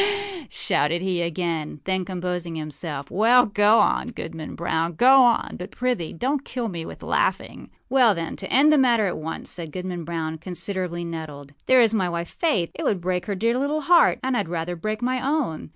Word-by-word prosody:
â 405 Hz, -6 st, -2 dB
shouted 160 Hz, +4 st, 0 dB
he 185 Hz, -2 st, 0 dB
again 170 Hz, +1 st, -1 dB, 0.2 s
and -, -, -9 dB
again; 150 Hz, -, -14 dB
then 190 Hz, -1 st, -1 dB
composing 180 Hz, -2 st, -4 dB
himself, 150 Hz, -2 st, -5 dB
âWell, 225 Hz, +2 st, +4 dB
go 210 Hz, +2 st, +5 dB
on, -, -, +2 dB
Goodman 165 Hz, -9 st, -7 dB
Brown, 170 Hz, 0 st, -1 dB
go 260 Hz, +9 st, +6 dB
on; 240 Hz, -2 st, +2 dB
but, 180 Hz, +2 st, -6 dB
prithee, 245 Hz, -9 st, -2 dB
donât 270 Hz, -, -1 dB
kill 245 Hz, -5 st, -4 dB
me 170 Hz, -3 st, -6 dB
with -, -, -10 dB
laughing.â 260 Hz, -, -2 dB
âWell, 240 Hz, -6 st, +5 dB
then, 165 Hz, -1 st, -4 dB
to -, -, -7 dB
end 295 Hz, +4 st, +5 dB
the 300 Hz, -, +4 dB
matter 240 Hz, -5 st, +3 dB
at 180 Hz, -, -2 dB
once,â 160 Hz, +1 st, -6 dB
said 165 Hz, -3 st, -5 dB
Goodman 180 Hz, 0 st, -5 dB
Brown, 160 Hz, -1 st, -4 dB
considerably 180 Hz, 0 st, -4 dB
nettled, 150 Hz, -4 st, -7 dB
âthere 255 Hz, -1 st, +6 dB
is 225 Hz, -1 st, +2 dB
my 190 Hz, -5 st, +1 dB
wife, 170 Hz, 0 st, -4 dB
Faith. 215 Hz, -, 0 dB
It -, -, -7 dB
would 200 Hz, -, 0 dB
break 180 Hz, 0 st, -2 dB
her 200 Hz, -, -1 dB
dear 230 Hz, +5 st, +1 dB
little 295 Hz, +3 st, -1 dB
heart; 340 Hz, +4 st, +5 dB
and 260 Hz, 0 st, 0 dB
Iâd 205 Hz, -6 st, -1 dB
rather 170 Hz, +1 st, -3 dB
break 215 Hz, +6 st, -4 dB
my 255 Hz, +1 st, 0 dB
own. 275 Hz, -, -1 dB
185 Hz, 205 wpm, -24 LUFS, 170-245 Hz, 0.2 s, go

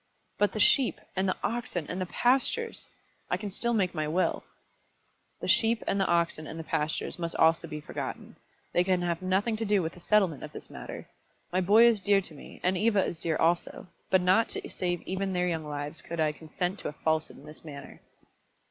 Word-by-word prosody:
"But 205 Hz, -2 st, +3 dB
the 215 Hz, -, -3 dB
sheep, 260 Hz, +4 st, +4 dB, 0.2 s
and 190 Hz, 0 st, +1 dB
the -, -, -1 dB
oxen, 225 Hz, -8 st, -2 dB
and 180 Hz, +2 st, -4 dB
the 185 Hz, -, -2 dB
pastures! 270 Hz, -, +1 dB, 0.4 s
I -, -, +1 dB
can 205 Hz, -2 st, -5 dB
still 235 Hz, +4 st, 0 dB
make 185 Hz, -4 st, +1 dB
my 155 Hz, -3 st, -1 dB
will." 175 Hz, +4 st, 0 dB, 1.0 s
"The -, -, -3 dB
sheep, 230 Hz, 0 st, +3 dB
and 200 Hz, -, 0 dB
the 190 Hz, -, +2 dB
oxen, 170 Hz, -2 st, +1 dB
and 165 Hz, -, -7 dB
the -, -, -4 dB
pastures 160 Hz, +2 st, -2 dB
must 170 Hz, -1 st, -3 dB
also 165 Hz, +1 st, +4 dB
be 155 Hz, -1 st, -5 dB
forgotten. -, -, -6 dB, 0.4 s
They 175 Hz, -, +4 dB
can 180 Hz, -1 st, +1 dB
have 170 Hz, -1 st, -1 dB
nothing 195 Hz, +5 st, +1 dB
to 225 Hz, -, -2 dB
do 205 Hz, -3 st, +2 dB
with 160 Hz, -, -3 dB
the -, -, -13 dB
settlement 185 Hz, -6 st, +2 dB
of -, -, -8 dB
this -, -, -8 dB
matter. -, -, -8 dB, 0.5 s
My 185 Hz, -, +3 dB
boy 210 Hz, +6 st, +6 dB
is 235 Hz, -3 st, +5 dB
dear 200 Hz, 0 st, +4 dB
to 180 Hz, -4 st, -5 dB
me, 145 Hz, -, -12 dB
and 185 Hz, +1 st, +2 dB
Eva 210 Hz, -3 st, +3 dB
is 165 Hz, -, -3 dB
dear 165 Hz, -2 st, +1 dB
also, 175 Hz, +2 st, 0 dB, 0.2 s
but 190 Hz, -, +4 dB
not 185 Hz, +5 st, +4 dB
to -, -, -4 dB
save 175 Hz, -2 st, -2 dB
even 190 Hz, +1 st, -2 dB
their 180 Hz, 0 st, +1 dB
young 160 Hz, -3 st, -2 dB
lives 145 Hz, +2 st, -4 dB
could 170 Hz, 0 st, -6 dB
I 155 Hz, -1 st, +3 dB
consent 175 Hz, +5 st, -4 dB
to -, -, -4 dB
a -, -, -4 dB
falsehood 160 Hz, +1 st, -1 dB
in 140 Hz, -, -14 dB
this 150 Hz, 0 st, -11 dB
matter." 145 Hz, -3 st, -10 dB
180 Hz, 215 wpm, -29 LUFS, 160-205 Hz, 1.0 s, boy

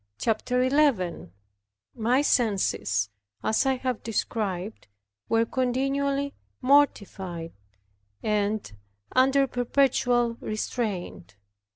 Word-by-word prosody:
CHAPTER 250 Hz, +3 st, 0 dB
11 255 Hz, -, +1 dB, 0.6 s
My 245 Hz, +4 st, +2 dB
senses 190 Hz, -, +1 dB, 0.3 s
(as 220 Hz, +5 st, +2 dB
I 265 Hz, -, +3 dB
have 255 Hz, -2 st, -3 dB
described) 210 Hz, -, -3 dB, 0.4 s
were 225 Hz, 0 st, +3 dB
continually 275 Hz, +3 st, 0 dB, 0.3 s
mortified, 200 Hz, -, +1 dB, 0.7 s
and 210 Hz, -, 0 dB, 0.4 s
under 270 Hz, +2 st, +4 dB
perpetual 245 Hz, -2 st, +1 dB
restraint. 210 Hz, -, -4 dB
240 Hz, 75 wpm, -26 LUFS, 205-265 Hz, 0.7 s, under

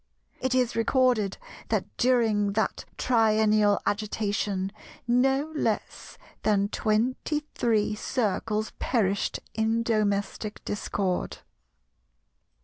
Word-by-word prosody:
It 260 Hz, -1 st, 0 dB
is 250 Hz, -2 st, +1 dB
recorded 230 Hz, -3 st, +2 dB, 0.3 s
that -, -, +1 dB
during 220 Hz, -5 st, +2 dB
that 220 Hz, -1 st, -1 dB
triennial 215 Hz, -3 st, +3 dB
agitation 205 Hz, -2 st, -1 dB, 0.4 s
no 270 Hz, +5 st, +2 dB
less -, -, -2 dB, 0.2 s
than 205 Hz, -1 st, +2 dB
twenty 240 Hz, +8 st, 0 dB
three 215 Hz, -3 st, +1 dB
Circles 215 Hz, -1 st, -1 dB
perished 200 Hz, -5 st, 0 dB
in 225 Hz, +1 st, +1 dB
domestic 210 Hz, -1 st, -1 dB
discord. 195 Hz, -2 st, -2 dB
215 Hz, 85 wpm, -27 LUFS, 205-240 Hz, 0.4 s, triennial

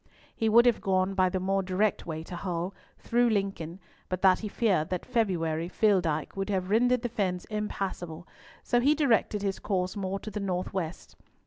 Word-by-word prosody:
He 225 Hz, -, +1 dB
would 235 Hz, +2 st, +6 dB
have 240 Hz, -2 st, +3 dB
gone 190 Hz, 0 st, +1 dB
by 185 Hz, -1 st, +3 dB
the 185 Hz, -, -1 dB
more 195 Hz, +1 st, +1 dB
direct 190 Hz, +2 st, 0 dB
way 160 Hz, -1 st, -4 dB
to 175 Hz, -, -8 dB
Hull, 175 Hz, +1 st, -3 dB, 0.2 s
through 240 Hz, 0 st, +2 dB
Lincoln, 195 Hz, -5 st, -2 dB, 0.3 s
but 185 Hz, 0 st, -3 dB
that 185 Hz, -1 st, +6 dB
he 215 Hz, -, -4 dB
feared 195 Hz, -7 st, +1 dB
that 180 Hz, -1 st, -3 dB
February 175 Hz, -9 st, 0 dB
Filldyke 180 Hz, -8 st, +1 dB
would 195 Hz, +1 st, -3 dB
have 190 Hz, -1 st, -1 dB
rendered 245 Hz, +2 st, +3 dB
the -, -, +1 dB
fens 185 Hz, -5 st, -2 dB
impassable, 190 Hz, -5 st, -4 dB, 0.4 s
so 240 Hz, -, +2 dB
he 285 Hz, +5 st, +4 dB
directed 230 Hz, -8 st, +2 dB
his 195 Hz, -1 st, -1 dB
course 185 Hz, -1 st, -1 dB
more 195 Hz, -1 st, -2 dB
to 215 Hz, -, -7 dB
the 210 Hz, -, -4 dB
north 185 Hz, -2 st, -2 dB
west. 180 Hz, -3 st, -5 dB
195 Hz, 190 wpm, -28 LUFS, 180-215 Hz, 0.4 s, would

